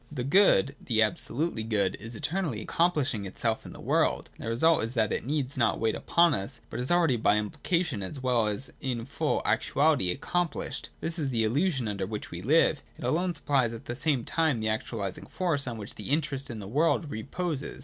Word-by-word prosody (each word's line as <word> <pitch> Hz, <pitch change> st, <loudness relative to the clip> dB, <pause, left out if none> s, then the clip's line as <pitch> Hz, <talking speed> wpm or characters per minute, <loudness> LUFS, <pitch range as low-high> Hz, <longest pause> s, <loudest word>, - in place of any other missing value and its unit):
The 130 Hz, -5 st, -3 dB
Good, 140 Hz, -, +4 dB
the 110 Hz, -3 st, +3 dB
absolutely 120 Hz, +5 st, -1 dB
Good, 105 Hz, -4 st, +1 dB
is 115 Hz, +3 st, -7 dB
eternally 160 Hz, -, -2 dB
accomplishing 145 Hz, -, +1 dB
itself 110 Hz, +4 st, -2 dB
in -, -, -9 dB
the -, -, -12 dB
world: -, -, +1 dB
and -, -, -11 dB
the 115 Hz, -, -3 dB
result 160 Hz, +7 st, +3 dB
is 115 Hz, +3 st, -4 dB
that 110 Hz, -3 st, +2 dB
it -, -, -3 dB
needs 140 Hz, -2 st, -1 dB
not 115 Hz, -3 st, +2 dB
wait 110 Hz, 0 st, +1 dB
upon 170 Hz, -2 st, +3 dB
us, 115 Hz, +5 st, -3 dB
but -, -, -4 dB
is 125 Hz, -, -2 dB
already 170 Hz, -8 st, +3 dB
by 105 Hz, -1 st, +3 dB
implication, 130 Hz, -, -1 dB
as 95 Hz, +9 st, -5 dB
well 125 Hz, -4 st, +2 dB
as 105 Hz, +6 st, -2 dB
in 125 Hz, -4 st, -2 dB
full 140 Hz, -, -1 dB
actuality, 140 Hz, -, +2 dB
accomphshed. 175 Hz, -4 st, -2 dB
This 165 Hz, +1 st, 0 dB
is 145 Hz, -3 st, -1 dB
the 115 Hz, -3 st, +1 dB
illusion 135 Hz, -, +1 dB
under 100 Hz, -2 st, -2 dB
which 105 Hz, 0 st, -6 dB
we 85 Hz, -, -6 dB
live. 150 Hz, -, +3 dB, 0.2 s
It -, -, -10 dB
alone 170 Hz, +8 st, 0 dB
supplies 130 Hz, -5 st, +1 dB
at 115 Hz, -, -9 dB
the 120 Hz, -, -4 dB
same 135 Hz, -2 st, +1 dB
time 160 Hz, -7 st, +1 dB
the 110 Hz, 0 st, 0 dB
actualising 110 Hz, -2 st, -3 dB
force 160 Hz, -7 st, -1 dB
on 120 Hz, -2 st, -3 dB
which 105 Hz, -1 st, -7 dB
the 105 Hz, -, -8 dB
interest 140 Hz, -2 st, -1 dB
in 115 Hz, -, -5 dB
the 100 Hz, -2 st, -7 dB
world 150 Hz, -, +1 dB
reposes. 140 Hz, +6 st, -4 dB
130 Hz, 205 wpm, -28 LUFS, 110-155 Hz, 0.2 s, Good